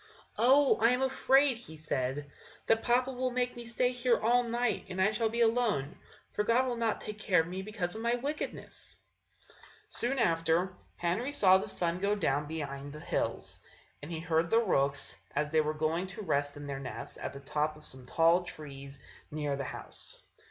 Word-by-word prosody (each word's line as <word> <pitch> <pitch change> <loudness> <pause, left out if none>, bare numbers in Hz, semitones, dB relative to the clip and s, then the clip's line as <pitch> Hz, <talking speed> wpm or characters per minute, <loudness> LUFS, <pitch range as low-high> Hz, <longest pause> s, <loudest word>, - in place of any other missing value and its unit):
"Oh! 270 +4 +5
I 230 - +6
am 250 +2 +2
afraid," 265 0 +4
he 160 -10 -11
said, 145 -1 -2 0.3
"that 225 0 +3
papa 250 +2 +2
will 255 0 -1
make 250 0 -1
me 240 -1 -8
stay 240 +2 +1
here 245 -1 +2
all 240 +3 +4
night! 240 0 -1
and 185 0 -5
I 190 +3 +4
shall 225 0 0
be 235 +2 -1
alone, 225 - +2 0.4
for 210 - 0
God 235 +4 +3
will 250 -2 -1
not 230 -2 0
take 210 0 -6
care 185 -5 +3
of - - -5
me 185 +2 -4
because 190 -3 -3
of 220 - -6
my 235 +1 +2
wickedness." 285 +5 -5 0.9
Soon 250 +3 0
afterwards 165 -3 +2 0.2
Henry 195 +11 -1
saw 190 -8 +6
the - - -4
sun 170 0 0
go 200 +2 +1
down 145 -7 0
behind 145 -2 -5
the 150 - -8
hills, - - -2 0.4
and 145 - -8
he 165 - -3
heard 165 0 +1
the 225 - +4
rooks 140 -10 +1 0.2
as 150 0 0
they 160 -1 +4
were 155 0 0
going 160 +4 0
to 205 +3 -7
rest 145 -4 0
in 145 - -7
their 140 -1 -4
nests 130 -2 -7
at - - -4
the 140 - -8
top 150 +2 -1
of 150 - -9
some 130 -1 -7
tall 165 +4 +4
trees 140 -5 -9 0.3
near 150 -2 -2
the 140 -1 -4
house. - - -6
185 Hz, 195 wpm, -31 LUFS, 150-235 Hz, 0.9 s, I